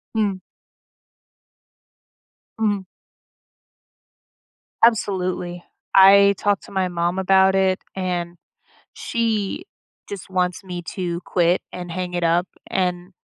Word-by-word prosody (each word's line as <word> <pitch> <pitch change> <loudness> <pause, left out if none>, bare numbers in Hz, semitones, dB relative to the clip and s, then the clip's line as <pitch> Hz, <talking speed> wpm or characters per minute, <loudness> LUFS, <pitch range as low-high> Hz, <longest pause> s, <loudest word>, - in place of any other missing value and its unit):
Mhm. 205 -4 0 2.2
Mhm. 205 -3 +1 2.0
Absolutely. 185 -5 +1 0.3
I 200 +1 +7
talked 205 -1 0
to - - -14
my 190 -1 0
mom 175 0 -1
about 190 0 +4
it, 190 -1 +2 0.2
and 175 -2 -3 0.6
she 225 - -2 0.5
just 200 -3 -7
wants 180 0 -1
me 180 -2 -6
to 175 -3 -3
quit 175 0 +2
and 180 -1 -7
hang 180 +1 -4
it 175 0 -1
up, 170 +2 +2 0.2
and 180 -1 -1
185 Hz, 100 wpm, -22 LUFS, 175-195 Hz, 2.2 s, I